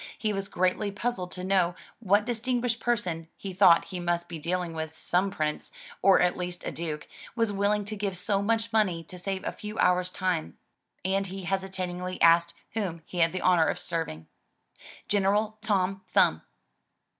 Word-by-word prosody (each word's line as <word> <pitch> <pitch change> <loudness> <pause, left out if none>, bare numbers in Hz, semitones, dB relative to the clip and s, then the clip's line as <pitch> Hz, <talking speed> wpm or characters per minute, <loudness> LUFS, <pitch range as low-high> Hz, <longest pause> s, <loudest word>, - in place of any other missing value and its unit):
He 215 -2 -1
was 195 -1 -3
greatly 185 +3 0
puzzled 200 -2 -3
to 180 - -5
know 185 -2 +2 0.2
what 205 -1 +3
dis 240 -2 -2
tinguished 245 -1 0
person 180 -9 -1
— - - -46
he 195 -1 -6
thought 180 -3 +6
he 185 - -6
must 175 0 -1
be 165 -1 -6
dealing 175 +1 -2
with 160 -1 -4
some 180 +4 +1
prince, 155 -4 -3 0.3
or 195 - +6
at 180 0 +3
least 180 0 -5
a - - -2
duke, 155 -2 -4
— - - -16
^was 230 -2 +2
willing 205 +1 +1
to 215 +1 -4
give 200 -3 -3
so 195 +2 +1
much 225 +2 0
money 185 -7 +2
to 180 +3 -9
save 190 +1 -3
a - - -1
few 210 +1 -8
hours' 180 0 +3
time, 180 -3 -2 0.5
and 195 +1 +1
he 190 +1 -7
hesitatingly 185 -1 -3
asked 170 0 +5 0.2
whom 185 -7 -3
he 180 - -6
had 165 0 +4
the 185 - -3
honor 175 -3 +4
of - - 0
serving. 160 - -4 0.8
"General 210 +2 +1
Tom 195 -3 0
Thumb!" - - +3
185 Hz, 185 wpm, -28 LUFS, 175-205 Hz, 0.8 s, thought